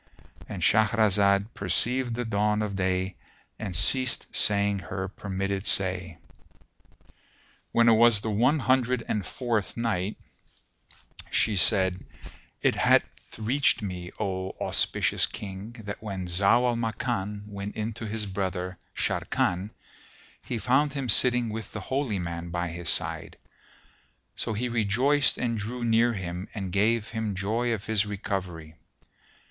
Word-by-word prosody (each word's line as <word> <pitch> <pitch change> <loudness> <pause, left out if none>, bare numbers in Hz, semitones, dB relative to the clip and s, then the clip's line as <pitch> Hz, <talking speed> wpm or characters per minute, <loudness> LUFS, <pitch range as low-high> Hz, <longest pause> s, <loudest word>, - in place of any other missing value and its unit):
"—And - - -5
Shahrazad 105 -1 +3
perceived 120 +5 0
the 120 0 -3
dawn 105 0 +1
of 100 -2 -3
day 95 0 -1 0.4
and 100 -5 -4
ceased 130 +8 +1
saying 100 -1 +2
her 95 0 -5
permitted 95 0 -2
say. 90 -3 +1 1.5
When 115 0 +4
it 115 - +7
was 115 -2 +5
the 110 - -2
One 120 +9 +3
Hundred 125 -3 +1
and 105 - -1
Fourth 115 0 -2
Night, 105 -4 -1 1.1
She 110 - +2
said, 95 0 +3 0.6
It - - +4
hath - - +1
reached 125 +2 +1
me, 90 -3 -5
O 95 -1 -3
auspicious - - +2
King, 100 +3 -8
that 100 0 -6
when 100 -4 -5
Zau 100 +7 +3
al 120 - 0
Makan 110 -3 -2
went 100 0 -7
in 110 +1 -3
to 115 0 -6
his 105 0 -2
brother 95 -2 -3 0.2
Sharrkan, 90 +4 -1 0.7
he 120 - -4
found 135 +6 +2
him 135 -4 -3
sitting 125 +1 +4
with 110 +1 -6
the 110 - -4
Holy 130 0 -2
Man 85 -1 -5
by 85 0 -2
his 85 0 -2
side; - - 0 1.0
so - - -2
he 120 +4 -2
rejoiced 120 +6 +2
and 115 -2 -1
drew 120 +4 -4
near 115 +1 +3
him 90 0 -5
and 95 -4 -4
gave 110 +3 +1
him 110 -3 -3
joy 110 +6 -1
of 110 -2 -3
his 105 -2 +1
recovery. 95 -6 -4
105 Hz, 135 wpm, -27 LUFS, 95-115 Hz, 1.5 s, it